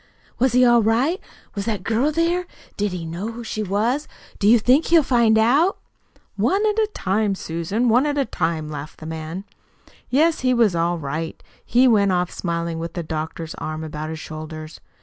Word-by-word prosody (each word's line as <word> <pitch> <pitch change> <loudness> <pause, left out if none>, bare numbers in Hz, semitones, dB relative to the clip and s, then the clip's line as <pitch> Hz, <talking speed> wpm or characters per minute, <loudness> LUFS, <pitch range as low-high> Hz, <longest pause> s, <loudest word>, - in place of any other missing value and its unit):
"Was 255 0 +2
he 250 0 +5
all 240 -1 +5
right? 250 - +1 0.3
Was 200 -1 -4
that 210 -5 -2
girl 230 +9 +1
there? 340 +3 0 0.3
Did 205 -1 -1
he 175 -2 -5
know 180 +8 -5
who 235 +1 -7
she 215 -1 -4
was? 220 +9 0 0.3
Do 205 - +2
you 235 +3 +7
think 255 +7 +3
he'll 330 -2 +5
find 235 -4 +3
out?" 280 - +3 0.6
"One 400 +3 +2
at 430 0 +1
a 430 -1 +2
time, 200 +1 0
Susan, 180 +8 -2
one 245 +5 +4
at 290 0 -1
a 275 - +2
time," 160 -6 -2
laughed 150 0 -7
the 155 - -9
man. 160 +3 -5 0.7
"Yes, 315 +5 +3
he 255 -1 +2
was 225 -7 +3
all 170 +1 +1
right. 160 +2 -5 0.2
He 250 +2 +4
went 205 -5 +4
off 180 -1 0
smiling, 170 -1 -3
with 165 +1 -5
the 175 - -3
doctor's 160 +1 -5
arm 155 0 -4
about 155 0 -5
his 160 - -5
shoulders. 155 0 -8
210 Hz, 190 wpm, -22 LUFS, 165-250 Hz, 0.7 s, you